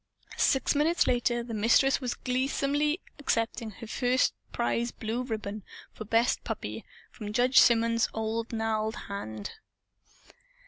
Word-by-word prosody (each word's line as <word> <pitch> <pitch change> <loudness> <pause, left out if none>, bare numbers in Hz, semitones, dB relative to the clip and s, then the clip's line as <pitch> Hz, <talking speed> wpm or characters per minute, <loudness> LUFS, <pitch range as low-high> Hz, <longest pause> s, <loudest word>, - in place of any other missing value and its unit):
Six 270 - +3
minutes 310 +4 +2
later 240 -1 +1
the 235 -1 -7
Mistress 235 +6 +3
was 250 -2 -2
gleesomely 280 +5 0 0.2
accepting 230 -5 -1
the - - -7
first 250 +3 +1 0.2
prize 235 0 0
blue 225 +3 -3
ribbon, 215 -4 -4 0.3
for 215 - -8
"best 230 +3 +2
puppy," - - -5 0.3
from 210 -3 -7
Judge 250 +3 +5
Symonds' 230 -1 +4
own 220 +1 -2
gnarled 220 -1 -1
hand. 110 - -5
230 Hz, 125 wpm, -29 LUFS, 220-255 Hz, 0.3 s, Judge